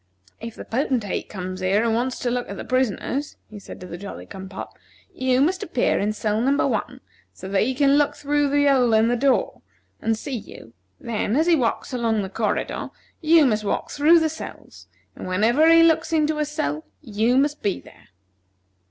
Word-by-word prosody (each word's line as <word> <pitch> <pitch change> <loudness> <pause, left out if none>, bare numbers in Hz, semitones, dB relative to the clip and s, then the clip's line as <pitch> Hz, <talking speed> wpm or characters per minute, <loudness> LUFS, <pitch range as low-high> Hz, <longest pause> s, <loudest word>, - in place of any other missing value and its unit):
"If 230 0 -8
the - - -9
Potentate 245 -4 -2
comes 185 -2 -6
here 190 +4 +1
and 230 -1 +1
wants 250 +3 -1
to 245 - -1
look 245 0 -2
at 200 - -6
the - - -7
prisoners," 255 +3 -1
he 210 - -9
said - - -11
to - - -7
the 175 -1 -8
Jolly 200 +1 -8
cum 190 -1 -9
pop, 190 - -8 0.4
"you 260 0 +1
must 350 +5 +1
appear 255 - 0
in 205 +1 0
cell 215 0 -1
number 275 +3 +2
One, - - -3 0.3
so 190 - -9
that 195 0 +1
he 260 +3 0
can 280 +1 +4
look 290 - +1
through 290 0 0
the 285 +1 +2
hole 255 -5 +4
in 220 +1 +4
the 245 - +2
door, 265 +2 +1 0.4
and 225 0 0
see 265 +4 -5
you; 115 - -10 0.3
then, 225 -1 -2
as 315 +3 +3
he 345 - +4
walks 255 -1 -1
along 225 -4 0
the 190 - -5
corridor, 215 +2 -2 0.3
you 320 -1 +5
must 215 -4 +1
walk 205 - -2
through 315 +4 +5
the 320 - +1
cells, 320 - -10 0.3
and - - -8
whenever 230 - +3
he 330 0 +7
looks 325 0 +2
into 310 -1 +1
a 300 - +1
cell, 155 - -3 0.2
you 225 +1 +1
must 290 +2 +1
be 200 -2 -1
there." - - -18
245 Hz, 205 wpm, -23 LUFS, 210-290 Hz, 0.4 s, he